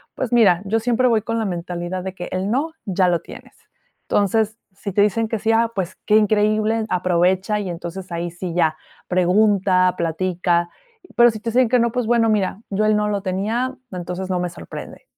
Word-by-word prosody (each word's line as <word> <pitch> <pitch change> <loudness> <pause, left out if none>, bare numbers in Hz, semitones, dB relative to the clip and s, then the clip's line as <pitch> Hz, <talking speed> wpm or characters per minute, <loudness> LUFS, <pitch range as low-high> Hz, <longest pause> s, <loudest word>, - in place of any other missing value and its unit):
pues 250 -2 -3
mira, 195 -7 +5
yo 220 +3 +1
siempre 245 +2 +2
voy 225 -3 +3
con 230 +1 -3
la 220 - -1
mentalidad 175 0 -4
de 190 0 -5
que 175 -1 -6
el 185 +2 -2
no, 285 +7 0
ya 185 -2 +2
lo 175 -1 +2
tienes. - - -13 0.5
Entonces, 215 +2 +1 0.2
si 200 +1 -6
te 200 - +2
dicen 220 +2 +1
que 225 0 -2
sí, 220 +2 +1
ah, 230 0 +2
pues 190 -2 -3
qué 210 - +3
increíble, 215 +1 +2
aprovecha 180 +3 +1
y 195 - -4
entonces 175 +2 -7
ahí 170 0 -3
sí 175 0 -6
ya 160 -3 +2 0.3
pregunta, 185 0 +3
platica. 175 +1 0 0.5
Pero 240 0 +7
si 215 - -7
te 230 +2 -4
dicen 250 0 +3
que 250 +1 +3
no, 235 0 +2
pues 245 0 -1
bueno, 235 -1 +3
mira, 205 -1 0
yo 210 +2 0
él 215 0 +3
no 210 0 +1
lo 200 -1 -1
tenía, 220 +7 -2 0.2
entonces 180 +1 -5
no 180 -1 0
me 180 0 -2
sorprende. 170 - -10
200 Hz, 200 wpm, -21 LUFS, 180-225 Hz, 0.5 s, Pero